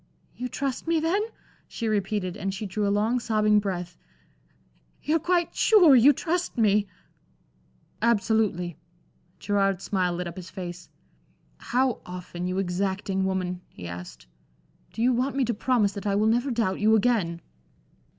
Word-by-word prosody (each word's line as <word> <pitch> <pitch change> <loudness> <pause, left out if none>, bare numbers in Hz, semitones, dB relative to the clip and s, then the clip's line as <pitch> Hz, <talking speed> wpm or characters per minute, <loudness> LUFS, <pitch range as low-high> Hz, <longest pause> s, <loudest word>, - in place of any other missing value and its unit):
"You 250 0 -4
trust 270 +3 -3
me, 330 -1 +2
then?" 335 +6 +1 0.5
she 230 - -4
repeated, 200 -3 -1
and 195 -2 -3
she 195 +2 -5
drew 205 +2 -1
a - - +2
long 215 +5 +1
sobbing 215 -2 +2
breath. 180 -4 -4 1.0
"You're 315 +3 +2
quite 345 +1 0
sure 360 -11 +6
you 255 +4 +7
trust 340 +2 -2
me?" 210 -2 +3 1.1
"Absolutely." 215 -6 +1 0.6
Gerard's 195 -2 0
smile 180 -3 0
lit 180 +1 -3
up 170 +2 -7
his 185 -1 -8
face. 180 -1 -8 0.7
"How 255 -1 0
often, 180 0 -6
you 185 +1 -2
exacting 190 +1 -1
woman," 185 -1 -2
he 90 - -9
asked, 85 -8 -9 0.7
"do 225 - -3
you 250 +1 +4
want 255 +3 0
me 270 -2 +2
to 235 - 0
promise 220 -2 +1
that 200 0 -5
I 200 - +1
will 210 +2 +2
never 240 +5 +2
doubt 225 -6 0
you 220 +1 +4
again." 210 -7 +1
210 Hz, 150 wpm, -26 LUFS, 185-245 Hz, 1.1 s, you